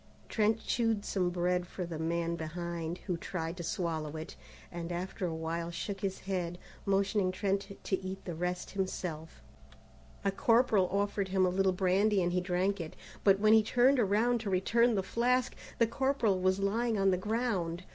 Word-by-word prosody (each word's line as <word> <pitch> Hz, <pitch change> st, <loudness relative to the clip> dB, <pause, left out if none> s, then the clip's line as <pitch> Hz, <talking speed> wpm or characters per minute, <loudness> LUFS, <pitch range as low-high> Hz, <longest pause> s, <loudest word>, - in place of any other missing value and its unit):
Trent 220 Hz, 0 st, +2 dB
chewed 225 Hz, -3 st, +1 dB
some 180 Hz, -3 st, 0 dB
bread 180 Hz, 0 st, 0 dB
for 180 Hz, -, -5 dB
the 165 Hz, -2 st, -6 dB
man 170 Hz, +1 st, -1 dB
behind, 170 Hz, +1 st, -4 dB
who 180 Hz, -4 st, -1 dB
tried 165 Hz, -1 st, -4 dB
to -, -, -5 dB
swallow 160 Hz, -4 st, -2 dB
it, 155 Hz, -, -7 dB, 0.4 s
and 170 Hz, 0 st, -5 dB
after 180 Hz, +1 st, -3 dB
a 165 Hz, -, -3 dB
while 165 Hz, +1 st, -3 dB
shook 195 Hz, +3 st, -5 dB
his 195 Hz, -1 st, -2 dB
head, 180 Hz, -3 st, -3 dB, 0.3 s
motioning 195 Hz, -1 st, +2 dB
Trent 195 Hz, +1 st, -2 dB
to 190 Hz, -1 st, -1 dB
eat 190 Hz, +1 st, -6 dB
the 175 Hz, -, -4 dB
rest 180 Hz, +2 st, -3 dB
himself. 180 Hz, -5 st, -4 dB, 0.8 s
A 195 Hz, -, +3 dB
corporal 220 Hz, -2 st, +3 dB
offered 200 Hz, 0 st, 0 dB
him 190 Hz, 0 st, +2 dB
a -, -, +3 dB
little 190 Hz, +1 st, +2 dB
brandy 190 Hz, +3 st, +2 dB
and 175 Hz, 0 st, 0 dB
he 180 Hz, -, +2 dB
drank 185 Hz, +2 st, 0 dB
it, 160 Hz, -, -7 dB, 0.3 s
but 195 Hz, -1 st, +6 dB
when 215 Hz, +1 st, +5 dB
he 220 Hz, -, +7 dB
turned 250 Hz, +5 st, +3 dB
around 230 Hz, +3 st, +2 dB
to 220 Hz, -2 st, -4 dB
return 230 Hz, +5 st, +3 dB
the 195 Hz, -, 0 dB
flask, 250 Hz, +5 st, +1 dB, 0.2 s
the 230 Hz, -, +5 dB
corporal 240 Hz, -5 st, +1 dB
was 185 Hz, +1 st, +2 dB
lying 220 Hz, +3 st, 0 dB
on 195 Hz, -1 st, +3 dB
the -, -, +3 dB
ground. 185 Hz, -4 st, -1 dB
190 Hz, 180 wpm, -32 LUFS, 175-210 Hz, 0.8 s, he